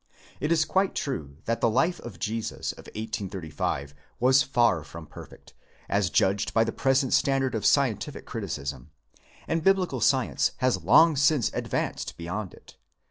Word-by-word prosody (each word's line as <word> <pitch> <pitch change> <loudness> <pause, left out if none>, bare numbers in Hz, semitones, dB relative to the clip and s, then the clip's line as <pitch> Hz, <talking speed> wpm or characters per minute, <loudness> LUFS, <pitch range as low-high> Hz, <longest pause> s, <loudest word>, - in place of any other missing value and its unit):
It 150 +4 -1
is 160 -2 +3
quite 190 0 +1
true 75 - -4
that 115 0 -1
the 115 - +4
Life 165 +10 +1
of 110 -7 -9
/Jesus 110 +1 -3
of - - -14
1835 95 -9 -4 0.3
was 130 +2 +5
far 120 - +2
from 80 +2 -10
perfect, - - -13 0.3
as 100 -2 +1
judged 100 +3 +1
by 115 - +5
the 115 - -2
present 135 +1 +1
standard 135 -1 +2
of 110 -3 +1
scientific - - +1
criti - - -5
cism, 70 -2 -6 0.6
and 165 0 -1
Biblical 185 -9 +2
science 130 +1 +2
has 130 -1 +1
long 165 -1 +6
since 140 -2 +2
advanced - - -3
beyond 90 +4 -5
it. - - -18
115 Hz, 155 wpm, -26 LUFS, 95-135 Hz, 0.6 s, long